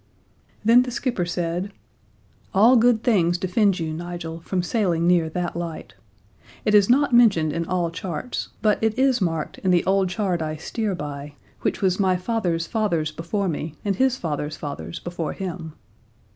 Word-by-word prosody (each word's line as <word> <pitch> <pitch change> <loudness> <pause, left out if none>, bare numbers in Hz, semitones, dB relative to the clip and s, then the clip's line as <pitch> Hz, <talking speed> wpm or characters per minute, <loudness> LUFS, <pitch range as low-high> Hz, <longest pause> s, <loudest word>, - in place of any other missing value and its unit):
Then 235 +3 +7
the 250 - -2
skipper 235 -7 -2
said: 175 +2 -2 0.8
"All 225 +6 +6
good 235 -1 +4
things 180 -8 +3
defend 185 +1 +1
you, 160 -1 -3
Nigel, 170 0 -6
from 180 +2 -2
sailing 175 -5 0
near 170 -2 +3
that 175 +1 -3
light. 170 -2 -6 0.7
It 210 - +2
is 205 0 +5
not 275 +1 +3
mentioned 195 -11 +5
in 165 +1 -2
all 175 -2 0
charts; 175 +7 -4 0.2
but 215 0 +2
it 220 -1 +1
is 260 -3 +3
marked 165 -4 -2
in 190 - -1
the 175 -1 +3
old 190 0 +2
chart 185 -3 -1
I 155 -1 -2
steer 200 +6 -3
by, 145 -2 -7 0.3
which - - -1
was 185 0 +2
my 190 -2 +3
father's 180 -4 -1
father's 170 -6 0
before 180 +6 -2
me, 155 -2 -4
and 200 -1 +1
his 260 +1 +2
father's 150 - -3
father's 85 - -6
before 175 -2 -4
him. 175 -4 -6
180 Hz, 170 wpm, -23 LUFS, 165-215 Hz, 0.8 s, Then